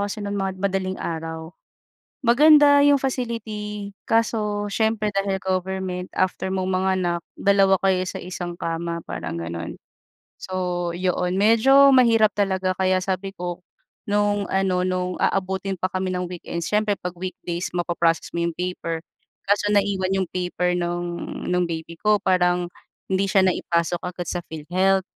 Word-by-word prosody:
kasi 210 - -5
no'n 200 0 -3
mga 195 -1 -1
madaling 190 -1 -1
araw. 160 0 -5 0.7
Maganda 290 +3 +7
yung 285 0 +6
facility 215 -6 -4 0.2
kaso 215 -2 +1
siyempre 215 -1 0
dahil 195 0 0
government, 185 -1 -2
after 185 0 0
mong 190 0 -1
manganak 185 -2 0 0.2
dalawa 195 -1 +4
kayo 190 -1 +3
sa - - -5
isang 175 -1 -6
kama, 170 0 -3
parang 85 0 -5
gano'n. 85 0 -5 0.6
So 185 - -7 0.4
'yon, 180 0 0
medyo 230 +8 +6
mahirap 230 -5 +5
talaga 190 -2 -1
kaya 185 -1 +2
sabi 195 +1 -3
ko 175 -2 -5 0.5
nung 205 -1 +1
ano 185 -1 +1
nung 185 0 -2
aabutin 190 0 0
pa 185 0 -2
kami 185 0 -2
ng 180 -1 -3
weekend, 170 -1 -5
siyempre 210 +3 +1
'pag 180 -2 -6
weekdays 175 -1 -5
ma-pa-process 170 -1 0
mo - - -4
yung 170 - -3
paper, 165 -2 -3 0.5
kaso 205 0 +3
naiwan 195 -2 +1
yung 190 -3 -1
paper 180 0 -1
nung 175 0 -3 0.2
nung 180 0 +2
baby 165 0 -6
ko, 210 0 +2
parang 180 -2 +2 0.4
hindi 190 +1 +2
siya 195 0 +3
naipasok 175 -2 +1
agad 180 -1 -5
sa 175 - -2
PhilHealth. 185 +5 +1
185 Hz, 145 wpm, -23 LUFS, 175-205 Hz, 0.7 s, Maganda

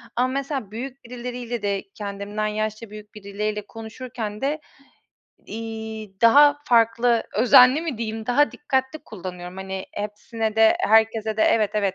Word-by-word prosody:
Ama 250 +2 +2
mesela 270 -5 -3
büyük 260 +4 -7
birileriyle 245 -1 -5
de 200 -1 -1
kendimden 205 +1 -4
yaşça 215 +1 -3
büyük 210 0 -12
birileriyle 210 +1 -4
konuşurken 225 -1 -7
de, 295 +3 -1 0.9
iii, 220 -3 -7
daha 290 +5 +6
farklı 230 -1 +3
"özenli" 250 +5 +6
mi 295 -9 -4
diyeyim? 220 -1 -4
Daha 290 +4 +3
dikkatli 265 0 -2
kullanıyorum. 180 -2 -8
Hani, 190 0 -6
hepsine 215 +1 -4
de, 220 0 +5
herkese 220 0 +2
de 215 - +2
Evet, 215 -2 +3
evet, 200 -2 0
220 Hz, 135 wpm, -23 LUFS, 210-245 Hz, 0.9 s, daha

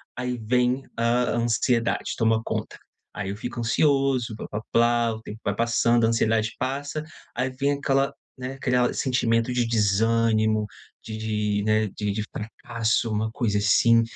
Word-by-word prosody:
aí 125 0 -3
vem 125 +3 +1
a 120 +1 +2
ansiedade, 120 0 0
toma 110 -1 +2
conta. - - -4 0.4
Aí 100 -2 -4
eu 100 - -4
fico 120 +2 -5
ansioso, 135 -1 +1
plá - - -7
plá 105 - -4
plá, 120 -1 +3
o 110 - -10
tempo 110 0 -9
vai - - -1
passando, 115 0 +2
a - - +3
ansiedade 115 -1 +1
passa, 140 +4 -3 0.3
aí 130 +2 0
vem 140 +2 0
aquela, 135 -1 +1 0.3
né, 130 +1 -6
criar 125 -1 +2
sentimento 120 -2 +1
de 120 -1 +1
desânimo, 110 0 +2 0.4
de 110 -1 -6
de, 105 -2 -1
né, 110 0 +2
de 105 +1 -3
de 105 +1 -2
fracasso, 115 +1 -2
uma 110 +1 -1
coisa 105 -3 0
assim. 115 +3 +5
115 Hz, 155 wpm, -25 LUFS, 110-125 Hz, 0.4 s, assim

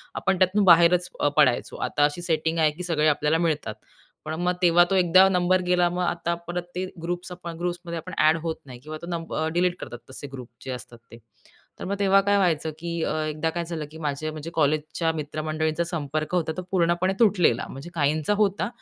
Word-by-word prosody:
आपण 190 0 0
त्यातून 190 +2 +3
अ, - - +3
बाहेरच 175 0 +6
अ, - - +2
पडायचो 130 -5 +3
आता 145 - +1
अशी 150 +4 -2
सेटिंग 165 -1 0
आहे 155 -1 +4
की 175 +4 -8
सगळे 155 -3 +1
आपल्याला 150 +1 +2
मिळतात. 150 -8 -2 0.5
पण 155 - -4
मग 180 0 +1
तेव्हा 175 0 +6
तो 195 - +1
एकदा 185 +1 +6
नंबर 185 0 +2
गेला 180 -1 +3
मग 180 +1 -2
आता 170 -1 -1
परत 175 0 -3
ते 185 +1 -2 0.2
ग्रुप 175 +1 -2
आपण 175 -2 -7
ग्रुप्समध्ये 175 0 -4
आपण 170 +3 -7
अ‍ॅड 155 +1 +4
होत 165 -1 -2
नाही 125 -3 -11
किंवा 155 +4 -8
तो 170 - -8
नंबर 170 -1 -4
अ, 160 - 0
डिलीट 175 +1 +1
करतात 120 - -7
तसे 135 +2 -8
ग्रुप 125 -3 -8 0.2
जे 130 - -4
असतात 125 -1 -8
ते. 115 - -11 0.6
तर - - -4
मग 200 - -1
तेव्हा 195 0 +5
काय 200 +1 +2
व्हायचं 165 -5 +1
की 170 +1 -5
अ, - - -1
एकदा 155 +1 -1
काय 170 +1 -3
झालं 165 -2 -5
की 160 - -10
माझे 155 0 -3
म्हणजे 155 +1 -7
कॉलेजच्या 155 +2 0
मित्रमंडळींचा 155 +1 -2
संपर्क 155 -1 -3
होता 160 -3 0
तो - - -2
पूर्णपणे 175 0 +2
तुटलेला. 185 - +3
म्हणजे 140 +6 -9
काहींचा 155 +2 +1
होता, 200 -1 0
165 Hz, 210 wpm, -25 LUFS, 155-180 Hz, 0.6 s, बाहेरच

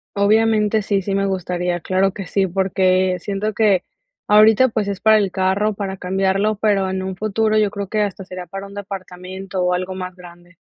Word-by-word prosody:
Obviamente 215 +1 +3
sí, 200 -1 0
sí 195 +1 -3
me 195 0 +1
gustaría, 180 -1 -2
claro 190 +2 +1
que 195 -1 -7
sí, 190 +2 0
porque 185 0 +1
siento 205 +3 -3
que 200 -4 +2 0.4
ahorita, 215 +4 +6
pues, 215 -2 -2
es 200 -2 -3
para 220 0 +5
el 200 -3 0
carro, 195 +3 +1
para 195 -1 -5
cambiarlo, 195 +3 0
pero 200 -2 +1
en 190 0 -3
un 190 -1 -4
futuro 215 +2 0
yo 210 -2 +3
creo 200 -1 -5
que 215 +1 -1
hasta 195 -2 -3
sería 185 -1 -8
para 195 +2 -7
un 200 - -12
departamento 190 -1 -6
o 180 0 +1
algo 185 +1 -2
más 185 -1 -6
grande. 175 0 -15
195 Hz, 195 wpm, -20 LUFS, 185-210 Hz, 0.4 s, ahorita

